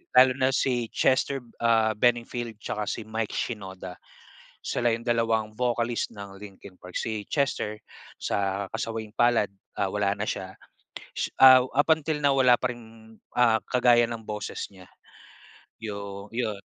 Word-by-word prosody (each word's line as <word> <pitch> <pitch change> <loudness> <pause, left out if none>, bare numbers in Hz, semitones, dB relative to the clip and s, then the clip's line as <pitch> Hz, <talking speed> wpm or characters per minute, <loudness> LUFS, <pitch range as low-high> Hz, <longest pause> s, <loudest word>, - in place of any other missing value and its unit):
lalo 130 0 +8
na 130 - +3
si 120 -3 0
Chester, 130 0 +1 0.2
ah, 115 -1 +3
Bennington 120 0 0
tsaka 105 -1 -3
si 115 - -3
Mike 110 0 -3
Shinoda. 95 -5 -5 0.7
Sila 120 - 0
'yong 115 +1 -3
dalawang 115 -2 +1
vocalist 120 -1 -1
ng 100 -1 -9
Linkin 100 -2 -12
Park. 90 0 -10
Si 110 -2 -2
Chester, 135 -7 -1 0.4
sa 100 0 -1
kasawiang-palad, 115 0 0 0.3
ah, 100 - 0
wala 100 -1 0
na 105 - -2
siya. 95 0 -4 0.8
Ah, 130 -1 +9
up 145 +4 0
until 155 -1 -3
now 140 -1 +4
wala 125 -2 +6
pa 125 - -1
ring, 110 -1 -15 0.2
ah, 115 -2 +5
kagaya 120 -1 +5
ng 115 -1 -6
boses 105 -1 -4
niya, 95 -2 -15 1.0
'yong 100 -1 -6
'yon 110 -4 -2
115 Hz, 140 wpm, -26 LUFS, 105-120 Hz, 1.0 s, Ah